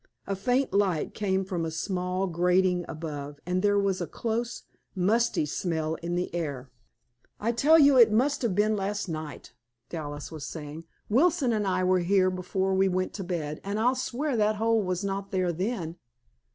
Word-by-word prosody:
A 195 - -2
faint 245 +5 0
light 195 -6 +1
came 190 -2 0
from 180 -3 -2
a 165 - -2
small 180 +3 -2
grating 180 0 +2
above, 150 -3 -6
and 180 +1 0
there 205 0 +3
was 195 -2 +1
a 175 - -2
close, 235 +6 -3 0.3
musty 210 0 +2
smell 160 0 -2
in 170 +1 -2
the 180 -1 -2
air. 140 -7 -4 0.7
"I 225 +3 0
tell 290 +7 +5
you 280 -4 +6
it 230 -2 +7
must 260 +7 +2
have 230 -7 0
been 215 +2 +2
last 205 +1 -2
night," 155 -5 -6 0.4
Dallas 145 -3 -6
was 155 -3 -7
saying. 155 +1 -7 0.2
"Wilson 265 0 +3
and 210 -2 0
I 185 -1 +1
were 185 0 +3
here 185 +1 +3
before 190 +1 -1
we 190 0 +3
went 185 0 -1
to 195 - -5
bed, 160 -4 -4
and 200 +2 -2
I'll 245 +3 +3
swear 260 +2 -2
that 215 0 +2
hole 225 +1 +2
was 185 -1 -2
not 195 0 -3
there 185 -2 0
then." 180 -2 -3
190 Hz, 180 wpm, -27 LUFS, 170-215 Hz, 0.7 s, it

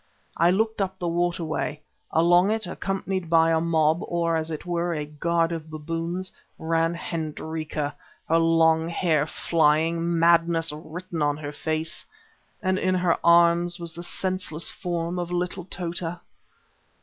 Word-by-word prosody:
I 170 +1 +4
looked 220 +3 +1
up 190 0 -2
the 175 - -3
water 175 0 0
way; 155 -1 -2 0.3
along 175 +4 +4
it, 220 -1 0
accompanied 190 -1 -3
by 165 0 +5
a 160 0 +2
mob, 160 -1 +2
or, 170 -1 0
as 160 0 -1
it 155 0 -5
were, 175 -1 -1
a 150 -1 -3
guard 165 +3 0
of 160 -2 -5
baboons, 165 +4 -4 0.3
ran 165 +1 0
Hendrika, 155 -2 -4 0.3
her 165 +1 +4
long 165 0 +3
hair 160 -4 +1
flying, 165 +2 +1
madness 165 -1 +3
written 160 +2 -6
on 145 0 +1
her 145 -1 -5
face, 155 +2 -2 0.6
and 185 0 +1
in 185 0 +1
her 180 -2 +2
arms 170 +1 +4
was 170 -1 -5
the 170 - -7
senseless 185 -2 -2
form 175 -1 -3
of 175 0 -4
little 180 0 -2
Tota. 175 -1 -4
170 Hz, 150 wpm, -25 LUFS, 160-175 Hz, 0.6 s, by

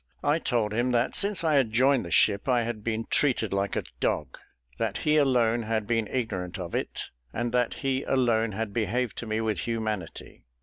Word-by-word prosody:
I 145 +3 +2
told 115 -8 0
him, 120 +3 +1
that 120 +1 +1
since 200 -3 +2
I 160 -2 +2
had 135 -6 +3
joined 130 +3 +3
the 85 - -7
ship 100 +7 +3
I 120 -2 +3
had 115 -2 -4
been 115 0 -2
treated 120 -8 +2
like 100 0 -1
a - - -1 0.2
dog; 70 +1 -1 0.4
that 110 -3 -1
he 155 0 +4
alone 120 -5 +3
had 110 -1 -1
been 115 -1 0
ignorant 95 -8 -3
of 90 -3 -6
it, - - -3 0.2
and 120 - -2
that 125 -1 +1
he 135 0 +1
alone 115 -4 +2
had 110 0 -3
behaved 115 +2 -1
to 120 - -6
me 110 +1 -1
with 110 -5 -1
humanity. 110 - -4
115 Hz, 200 wpm, -27 LUFS, 105-125 Hz, 0.4 s, he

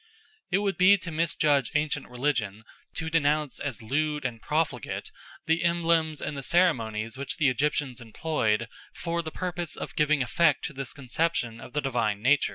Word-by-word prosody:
It - - +3
would 200 -1 0
be 200 +2 +7
to 175 -3 -6
misjudge 155 -4 +2
ancient 150 -1 0
religion 120 -5 -1 0.3
to 160 0 -3
denounce 150 -2 +1
as 130 -5 -4
lewd 150 +4 -1
and 115 -3 -3
profligate 150 -7 -2 0.3
the 165 +1 +2
emblems 165 -2 +2
and 150 - -3
the 140 - -4
ceremonies 120 -8 +1
which 140 -1 -2
the 145 -3 +4
Egyptians 130 -1 -1
employed 115 -2 0 0.3
for 170 0 -2
the 160 - -5
purpose 175 -1 -4
of - - -7
giving 150 -2 +3
effect 150 +2 +2
to 150 - -5
this 135 -1 -5
conception 130 -3 -1
of 125 - -11
the 150 - 0
divine 115 -6 -1
power. 140 +3 +6
145 Hz, 165 wpm, -27 LUFS, 125-160 Hz, 0.3 s, be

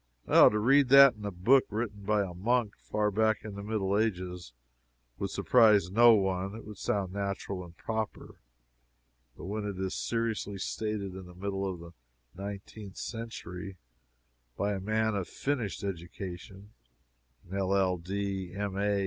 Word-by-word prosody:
To - - +8
read 135 +5 +4
that 140 0 +9
in 105 -2 -10
a 100 - -2
book 115 +10 +4
written 105 -1 -3
by 105 0 +2
a 90 -2 -6
monk 110 +4 0
far 105 0 -1
back 110 +1 +1
in 105 - -6
the 100 - -7
Middle 100 -2 -1
Ages, 90 - -2 0.7
would - - -2
surprise 105 -7 +4
no 120 +3 +7
one; 95 -1 0
it 115 - -9
would 105 -2 -10
sound 95 -3 -1
natural 100 -1 -3
and 85 0 -14
proper; 110 -1 -4 1.0
but - - -9
when 105 +3 -3
it 100 -2 -4
is 95 0 -2
seriously 115 -3 -2
stated 105 -1 -3
in 95 -1 -9
the 90 - -13
middle 95 +1 -2
of 90 - -8
the 85 0 -11 0.4
nineteenth 100 +1 -8
century, 100 -5 -6 0.8
by 100 +1 0
a 95 - -3
man 110 +2 0
of 100 -3 -2
finished 125 -10 -3
education, 95 +2 -7 0.8
an 95 +3 -4
LL.D., 95 0 -1
M. 100 -1 -3
A. 100 0 +1
100 Hz, 155 wpm, -30 LUFS, 95-110 Hz, 1.0 s, that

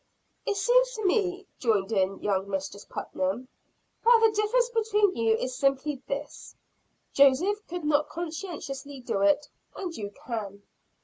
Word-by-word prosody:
"It 410 - +1
seems - - +3
to 435 -2 -4
me," 380 0 +1
joined 215 -4 +1
in 195 -2 0
young 195 -1 0
Mistress 195 +1 -4
Putnam, 195 +7 -3 0.6
"that 470 0 +7
the 445 - +6
difference 430 +4 +2
between 425 -4 +2
you 225 -1 +3
is 255 +3 -3
simply 275 +1 0
this. 280 0 -6 0.6
Joseph 335 +10 +4
could 350 -1 -5
not 300 0 +2
conscientiously 300 -5 -6
do 200 -5 -2
it; 200 +8 +3 0.3
and 355 -4 -5
you 205 -2 -5 0.2
can." 205 -4 -5
285 Hz, 140 wpm, -27 LUFS, -, 0.6 s, that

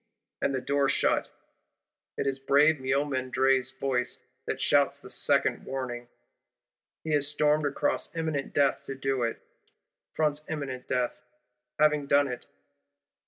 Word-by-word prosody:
and 140 - +1
the - - 0
door 140 0 +1
shut. - - +1 0.9
It - - -1
is 135 -1 -1
brave 145 +3 +4
Miomandre's 130 -1 +1
voice 125 -2 -1 0.3
that - - -2
shouts - - +3
this - - -8
second - - +2
warning. 125 -2 -5 1.0
He 160 - -3
has 145 -2 +2
stormed 150 0 +2
across 145 +1 -1
imminent 160 -4 -2
death 140 0 +2
to 135 - -5
do 135 -1 -1
it; 115 -1 -1 0.8
fronts 150 -1 +1
imminent 135 -5 -5
death, 125 -1 -1 0.6
having 150 -1 +3
done 140 0 +4
it. 125 -2 -6
140 Hz, 130 wpm, -28 LUFS, 130-145 Hz, 1.0 s, brave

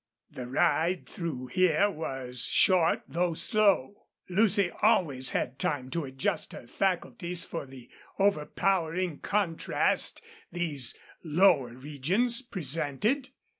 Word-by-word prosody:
The 125 - -7
ride 165 +7 +1
through 155 -8 -5
here 185 +4 +3
was 130 -7 -4
short, 180 -3 +4
though 170 +3 -1
slow. 205 - +1 0.2
Lucy 200 -1 +3
always 160 - +3
had 130 +2 -2
time 130 -3 -1
to 165 -3 -2
adjust 130 0 -3
her - - -9
faculties 180 +2 -2
for 165 -4 -6
the 130 -2 -13 0.3
overpowering 180 -2 0
contrast 195 -6 0 0.3
these 150 -8 -1 0.3
lower 155 -7 +3
regions 160 - 0
presented. 190 - -2
170 Hz, 105 wpm, -28 LUFS, 135-190 Hz, 0.3 s, short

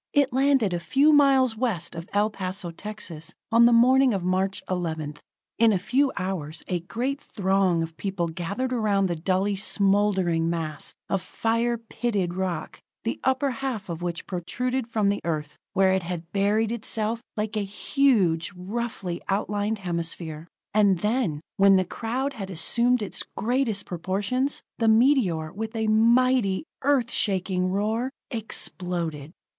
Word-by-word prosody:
It 285 -4 +3
landed 265 -7 +3
a 175 - -1
few 285 - +3
miles 270 -5 +5
west 215 -8 -1
of 165 +1 -8
El 210 +1 +2
Paso, 185 -2 -4
Texas, 170 -4 -6 0.2
on 235 +1 +7
the - - +4
morning 255 +1 +5
of 190 - -2
March 190 +2 0
11th. 160 -5 -3 0.4
In 230 -1 +6
a 200 - +2
few 260 +9 +1
hours 175 -5 -4
a 180 - -1
great 250 - -3
throng 190 -4 +1
of 165 0 -7
people 190 -3 -2
gathered 195 +10 -3
around 210 -4 +2
the 175 -2 -1
dully 190 +4 0
smoldering 195 -4 +2
mass 160 -3 -2
of 195 - 0
fire 230 +4 0
pitted 220 -5 -2
rock, 180 -3 -3 0.2
the 230 - -2
upper 265 +1 +1
half 245 -6 -4
of 170 0 -5
which 175 -1 -3
protruded 250 +8 -2
from 215 -4 +1
the 205 - -1
Earth 150 -2 -3 0.2
where 190 -1 +4
it 190 - +1
had 170 -1 -6
buried 210 +3 +1
itself, 225 0 -1 0.2
like 215 0 -2
a - - +1
huge, 200 - +1
roughly 190 -2 -4
outlined 205 +2 0
hemisphere. 170 -3 -4 0.3
And 200 -3 +4
then, 210 - 0 0.2
when 195 0 +6
the 185 -1 +3
crowd 250 +8 -3
had 195 -6 -6
assumed 235 +7 +2
its 205 - -4 0.2
greatest 230 -3 0
proportions, 200 - -2 0.2
the 225 - +2
meteor, 220 - +3
with 220 +3 -5
a 220 0 0
mighty, 230 -1 +3 0.2
Earth 265 -4 +2
shaking 185 -2 0
roar, 215 +6 0 0.2
exploded. 175 - -3
200 Hz, 150 wpm, -25 LUFS, 180-235 Hz, 0.4 s, on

